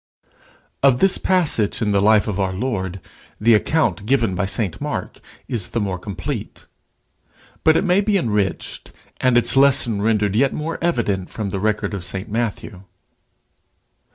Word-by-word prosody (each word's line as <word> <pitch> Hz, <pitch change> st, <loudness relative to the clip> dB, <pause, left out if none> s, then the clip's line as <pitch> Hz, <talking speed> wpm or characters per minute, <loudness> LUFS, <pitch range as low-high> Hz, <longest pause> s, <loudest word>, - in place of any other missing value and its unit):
Of 135 Hz, -3 st, +5 dB
this 190 Hz, +6 st, +3 dB
passage 160 Hz, -, +1 dB
in 105 Hz, -2 st, 0 dB
the 100 Hz, -1 st, +2 dB
life 105 Hz, +1 st, +4 dB
of 100 Hz, -2 st, -2 dB
our 95 Hz, -1 st, 0 dB
Lord, 95 Hz, -4 st, -3 dB, 0.4 s
the 115 Hz, +2 st, +4 dB
account 105 Hz, -, +1 dB
given 115 Hz, -6 st, +2 dB
by 95 Hz, +2 st, -1 dB
St 100 Hz, -2 st, -2 dB
Mark -, -, -4 dB, 0.3 s
is 110 Hz, -7 st, -3 dB
the 115 Hz, -, -2 dB
more 95 Hz, -3 st, -2 dB
complete. 95 Hz, -1 st, -6 dB, 1.0 s
But 160 Hz, 0 st, +5 dB
it -, -, +1 dB
may 185 Hz, +1 st, +3 dB
be 205 Hz, 0 st, +1 dB
enriched 105 Hz, -, -2 dB, 0.3 s
and 130 Hz, -1 st, +3 dB
its 120 Hz, +2 st, +3 dB
lesson 135 Hz, -6 st, +3 dB
rendered 105 Hz, -2 st, +1 dB
yet 135 Hz, +4 st, +2 dB
more 160 Hz, +2 st, -4 dB
evident 110 Hz, -, -1 dB
from 105 Hz, -3 st, -4 dB
the 95 Hz, -, -3 dB
record 105 Hz, 0 st, -1 dB
of 100 Hz, -3 st, -4 dB
St 95 Hz, +4 st, -5 dB
Matthew. 110 Hz, -3 st, -3 dB
110 Hz, 155 wpm, -20 LUFS, 100-130 Hz, 1.0 s, Of